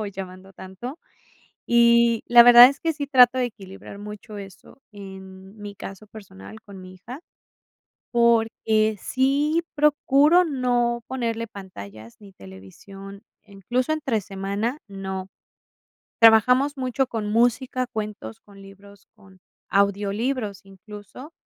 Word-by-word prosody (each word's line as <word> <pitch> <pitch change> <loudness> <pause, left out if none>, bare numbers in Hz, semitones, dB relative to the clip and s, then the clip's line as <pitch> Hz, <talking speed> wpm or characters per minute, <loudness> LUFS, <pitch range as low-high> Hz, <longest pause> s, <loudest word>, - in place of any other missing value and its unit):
o 215 - -4
llamando 190 -1 -10
tanto. 195 - -10 0.7
Y 235 -1 +3
la 240 0 +8
verdad 245 0 +9
es 275 - -8
que 325 -1 -2
sí 290 -2 -6
trato 255 -2 +5
de 250 - +1
equilibrar 200 -4 -11
mucho 210 +1 -10
eso, 195 +6 -13
en 190 0 -12
mi 205 -1 -9
caso 195 +2 -10
personal 110 - -13
con 200 -2 -13
mi 185 0 -12
hija, 235 +9 -11 0.9
porque, 225 -2 +1
sí 285 +5 0
procuro 300 +3 +3
no 245 -5 -1
ponerle 230 -3 -4
pantallas 115 - -12
ni 200 -2 -16
televisión, 195 - -13 0.2
incluso, 220 - -3
entre 275 -8 -2
semana 200 +6 -4
no. 190 -1 -7 0.9
Trabajamos 250 +6 +4
mucho 260 0 -2
con 225 -3 -4
música, 245 +2 0
cuentos, 210 - -7
con 200 -1 -17
libros, 200 +1 -17
con 190 -3 -21 0.3
audiolibros, 200 +2 -1
incluso, 210 - -13
215 Hz, 120 wpm, -23 LUFS, 195-245 Hz, 0.9 s, verdad